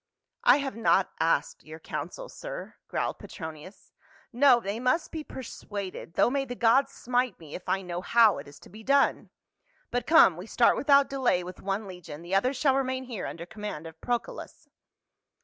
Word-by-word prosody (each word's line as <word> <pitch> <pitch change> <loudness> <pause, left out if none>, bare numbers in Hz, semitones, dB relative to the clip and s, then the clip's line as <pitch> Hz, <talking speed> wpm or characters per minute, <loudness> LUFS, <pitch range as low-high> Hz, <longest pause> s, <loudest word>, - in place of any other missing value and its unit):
"I - - +7
have 275 -2 -3
not 225 -4 +2
asked 160 -3 0
your 155 +1 -10
counsel, - - -6
sir," - - -8
growled - - -2
Petronius. 160 +2 -10 0.2
" 310 -4 -29
No, 250 0 +6
they 205 0 -4
must 255 +7 +1
be 315 -1 -5
persuaded, 200 - -7
though - - +4
may 275 0 0
the 245 -2 -6
gods 255 +4 +3
smite 245 -3 -1
me, 155 -3 -12
if 180 - -7
I 190 0 0
know 175 -1 -4
how 225 0 +4
it - - -10
is 145 - -13
to - - -15
be 215 +4 -12
done. 275 +3 +2 0.6
But 245 -1 -2
come, 305 - +6
we 180 +4 -8
start 235 +1 +4
without 280 -1 +4
delay 255 -10 +1
with 180 +1 -9
one 200 +2 -2
legion, 170 -4 -9
the 175 +2 -6
other 200 +7 +3
shall 275 0 +2
remain 260 -1 -1
here 240 -6 -5
under 170 0 -7
command 210 -5 -7
of 160 0 -11
Procullus." 240 -1 -4
225 Hz, 185 wpm, -28 LUFS, 180-265 Hz, 0.6 s, I